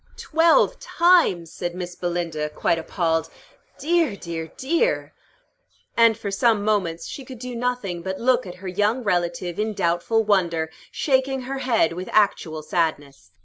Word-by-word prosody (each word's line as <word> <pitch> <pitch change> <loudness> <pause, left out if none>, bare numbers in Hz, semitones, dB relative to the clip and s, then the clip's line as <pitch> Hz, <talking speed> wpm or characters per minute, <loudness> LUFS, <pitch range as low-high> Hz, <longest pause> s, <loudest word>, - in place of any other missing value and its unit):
"Twelve 330 +9 +3
times!" 335 - +3
said 175 -1 -4
Miss 180 -1 -5
Belinda, 170 -4 -2
quite 165 +2 0
appalled. 165 -1 -1 0.5
"Dear, 320 -5 +1
dear, 165 -4 -6
dear!" 340 - 0 0.8
And 230 -2 +5
for 205 -3 -4
some 210 0 +2
moments 180 -6 0
she 275 - -7
could 255 0 -10
do 250 +1 -6
nothing 235 -8 -2
but 190 +1 -4
look 255 -2 +2
at 180 - -8
her - - -3
young 210 +7 0
relative 175 -2 -1
in 215 0 -1
doubtful 185 +5 +1
wonder, 170 -6 +1 0.2
shaking 265 -1 +1
her 270 +2 -4
head 230 -11 +2
with 180 +2 -6
actual 165 -7 +1
sadness. 145 - -2
195 Hz, 145 wpm, -23 LUFS, 170-250 Hz, 0.8 s, And